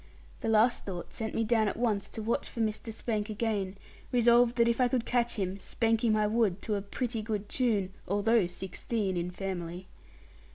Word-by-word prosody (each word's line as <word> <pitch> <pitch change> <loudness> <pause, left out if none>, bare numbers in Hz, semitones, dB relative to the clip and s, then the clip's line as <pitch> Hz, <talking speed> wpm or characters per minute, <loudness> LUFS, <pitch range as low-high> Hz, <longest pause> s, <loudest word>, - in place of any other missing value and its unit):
That - - -2
last 225 +2 +4
thought 180 -3 -6
sent 220 -1 -4
me 225 - +2
down 225 -1 +3
at 205 - -2
once 220 -4 0
to 220 - -6
watch 235 +5 -1
for 235 - -8
Mr. 220 0 -1
Spank 215 -1 -2
again, 205 -3 -1 0.3
resolved 240 0 +5
that 235 -1 +4
if 235 +2 +2
I 250 - +5
could 245 -2 0
catch 240 -1 +1
him, 195 -2 -2
spank 225 +2 0
him 220 -2 +4
I 215 0 +2
would 210 -3 +1
to 215 - -1
a 200 - 0
pretty 225 +3 -3
good 210 -2 -3
tune, 210 -8 0
although 205 +1 +3
sixteen 190 +2 -3
in 175 0 -1
family. 180 -1 -5
220 Hz, 195 wpm, -30 LUFS, 195-235 Hz, 0.3 s, resolved